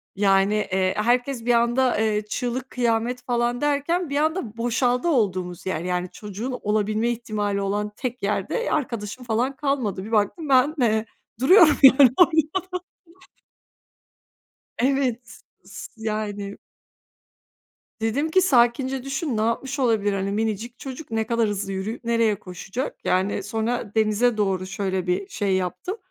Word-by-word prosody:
Yani, 195 0 +3 0.2
eee, 185 0 +1
herkes 245 +2 0
bir 245 - +3
anda, 240 +2 +2
eee, 215 -1 +1
çığlık 250 +2 -3
kıyamet 240 0 0
falan 240 0 -1
derken, 295 +4 0
bir 280 - -1
anda 305 - -1
boşaldı 245 +4 +1
olduğumuz 185 - 0
yer, 185 -4 -2
yani 180 0 -2
çocuğun 220 +5 -6
olabilme 215 +2 0
ihtimali 210 -4 -2
olan 205 +1 -2
tek 250 -1 -5
yerde 210 - -1
arkadaşım 240 -4 -3
falan 240 +4 0
kalmadı. 265 -10 -1
Bir 220 - -9
baktım 225 - 0
ben, 270 +3 +4
eee, 220 -2 +2 0.3
duruyorum 315 - +6
yani 265 0 +9
orada. 355 -1 +6 2.5
Evet 260 -2 +1
s 245 - -14 0.2
s - - -9 0.2
yani. 205 -2 -3 1.4
Dedim 260 +8 0
ki 375 - +4
"Sakince 260 -3 +2
düşün, 275 -2 -2
ne - - +1
yapmış 265 +5 -1
olabilir, 220 -5 +2
hani, 195 0 -2
minicik 220 +3 -3
çocuk, 270 0 -8
ne 220 -1 -1
kadar 230 -2 +1
hızlı 200 -1 -3
yürüyüp 195 +6 -4
nereye 230 -2 +2
koşacak?" 195 - -6
Yani, 190 +2 0
sonra 225 +1 -2
denize 220 +2 +2
doğru 190 -3 0
şöyle 190 -2 -2
bir 180 - -1
şey 200 - 0
yaptım. 185 - -3
230 Hz, 140 wpm, -23 LUFS, 205-260 Hz, 2.5 s, yani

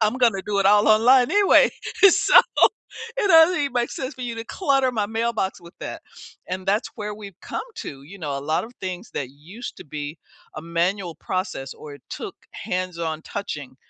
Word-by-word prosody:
I'm 215 +1 +2
gonna 230 -6 +3
do 205 -1 0
it 195 - +3
all 205 +1 +5
online 245 +4 +5
anyway. 410 +4 +5 0.4
So, 360 - +6 0.8
it 455 -5 +1
doesn't 325 +1 +7
even 280 -2 -1
make 245 -1 0
sense 260 -1 -5
for 255 - -8
you 240 -1 -3
to 225 - -5
clutter 270 -2 +1
my 210 -3 0
mailbox 225 -4 -2
with 170 +1 -15
that, - - -6 0.5
and 185 +1 -4
that's 205 +4 +1
where 210 -2 -4
we've 200 -4 -11
come - - -4
to, 135 - -7
you 180 +8 -12
know, 145 -4 -3
a - - -4
lot 155 +3 -1
of 230 - -12
things 185 -1 -5
that 130 -2 -4
used 175 - -10
to - - -11
be 150 +1 -6 0.4
a - - -4
manual 170 +2 -1
process 160 -6 -4
or 150 -2 -10
it 145 - -16
took - - -6 0.2
hands-on 170 -3 -3
touching 145 -11 -6
200 Hz, 195 wpm, -23 LUFS, 165-235 Hz, 0.8 s, doesn't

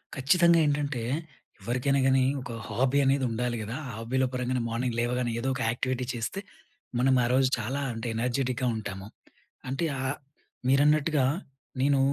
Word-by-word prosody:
ఖచ్చితంగా 170 +5 +4
ఏంటంటే, 145 -3 0 0.6
ఎవరికైనా 130 +3 +1
కాని 135 0 +4 0.2
ఒక 125 -1 -7 0.2
హాబీ 130 +3 +1
అనేది 135 0 +2
ఉండాలి 120 +1 -1
గదా! 110 +3 -5
ఆ - - -6
హాబీల 125 +4 0
పరంగానే 125 0 -1
మార్నింగ్ 120 +1 -1
లేవగానే 120 0 0
ఏదో 130 - -2
ఒక 130 - -4
యాక్టివిటీ 125 +1 -2
చేస్తే, 120 +11 -3 0.6
మనం 130 +1 +4
ఆ - - +2
రోజు 130 0 +4
చాలా 130 +6 -2
అంటే 115 +1 -5
ఎనర్జిటిక్‌గా 125 +1 0
ఉంటాము. 100 -3 -6 0.6
అంటే 135 +6 -1
ఆహ్, 135 +2 -2 0.5
మీరన్నట్టుగా 145 +1 +4 0.6
నేను 140 0 +3
130 Hz, 145 wpm, -28 LUFS, 120-140 Hz, 0.6 s, ఖచ్చితంగా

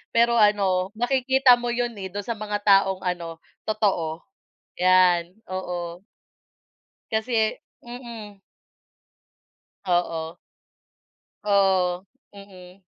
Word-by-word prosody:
pero 235 0 +4
an,o 195 -3 +3
makikita 255 +1 +3
mo 240 - -4
'yon, 240 0 -1
eh, 190 - -4
dun 205 +2 -6
sa 235 - -4
mga 210 -1 -4
taong 195 -2 +3
ano, 170 -2 -4 0.2
totoo 190 -7 -1 0.6
'yan, 180 -1 +4 0.2
oo. 180 -1 -5 1.0
Kasi, 220 0 0 0.2
mhm. 235 -5 -10 1.5
Oo. 170 -2 -1 1.1
Oo, 190 -3 +2 0.3
mhm. 195 -2 -14
195 Hz, 90 wpm, -24 LUFS, 180-220 Hz, 1.5 s, pero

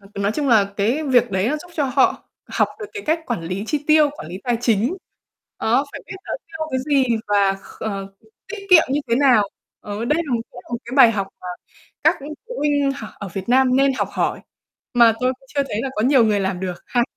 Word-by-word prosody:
H - - -22 0.2
nói 200 +2 +1
chung 285 +2 -1
là 205 -4 +4
cái 235 +10 +1
việc 245 -5 +3
đấy 190 +4 +1
nó 305 - 0
giúp 350 +3 -13
cho 295 - +1
họ 265 0 +1 0.2
học - - +1
được 420 - -5
cái 420 -2 -6
cách 320 +2 +1
quản 240 -7 -2
lý 185 +5 -4
chi 295 -2 -2
tiêu, 305 -2 +5
quản 160 - -10
lý 185 +2 -6
tài 240 -2 +1
chính. 240 - +1 0.6
Đó, 245 +6 +2
phải - - -7
biết - - -8
nó - - -5
tiêu 320 -1 -5
cái 260 - 0
gì 280 -3 +3 0.2
và 200 -1 +3
kh - - -15
ờ, 195 -2 -4 0.3
tiết 400 -3 -7
kiệm 330 -3 +9
như 285 +2 +1
thế 235 - +4
nào. 245 -8 +4 0.3
Ờ 205 +2 -5
đây 300 +7 +1
là 275 - -3
một 230 - 0
cái 245 - -10
một 235 - -2
cái 240 - -9
bài 245 -4 +8
học 200 -3 -2
mà - - -10 0.6
các - - +5
phụ 385 - -8
huynh 285 -2 +1
học 280 - -8
ở 200 - -6
Việt 195 +1 -5
Nam 255 +1 +4
nên 275 +1 +4
học - - 0
hỏi, - - -1 0.5
mà 235 -2 +6
tôi 255 +1 +2
cũng 270 - -23
chưa 280 - +2
thấy 210 - -2
là 270 - -2
có 215 - +1
nhiều 260 -1 +5
người 210 -2 +2
làm 190 -2 -2
được 185 -1 -3
ha. 245 -2 +1
250 Hz, 245 wpm, -21 LUFS, 205-290 Hz, 0.6 s, kiệm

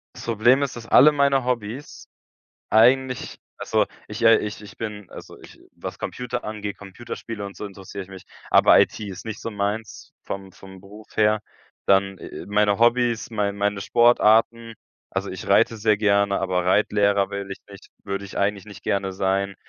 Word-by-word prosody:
Das - - -9
Problem 120 +4 +3
ist, 140 -1 -2
dass 120 -1 -9
alle 150 +6 +7
meine 140 -2 +2
Hobbys, 125 +2 -4 0.7
eigentlich 125 +3 +3 0.2
also - - +1 0.2
ich, 105 +3 -7
äh, 115 0 +7
ich 105 0 -5
ich 105 - -13
bin, 105 -4 -6
also - - -12
ich - - -15
was - - -8
Computer 125 -1 -5
angeht, 105 -2 -5
Computerspiele 105 +1 -8
und 100 - -11
so - - -7
interessiere 100 0 -8
ich 95 - -19
mich, 95 -1 -11 0.3
aber - - +6
IT - - +2
ist 100 -4 -7
nicht 110 -2 -6
so 115 - -5
meins 105 +1 -4
vom 95 -1 -7
vom 95 +1 -13
Beruf 105 +2 -13
her. 105 0 +3 0.5
Dann, 95 0 +2
äh - - -10 0.2
äh, - - -12
meine 105 0 +2
Hobbys, 120 -1 +2
mei 105 -3 0
meine 100 0 -1
Sportarten 115 +1 +3 0.3
also - - -4
ich - - -8
reite 115 - +3
sehr 105 0 +2
gerne, 100 -1 +2
aber 90 -2 -1
Reitlehrer 100 0 +2
will 100 0 -5
ich 95 - -7
nicht 100 +1 -14 0.2
würde 100 0 -4
ich - - -11
eigentlich 100 -1 -1
nicht 100 -7 -12
gerne 95 -1 -1
sein. 95 +1 -1
105 Hz, 180 wpm, -23 LUFS, 100-115 Hz, 0.7 s, alle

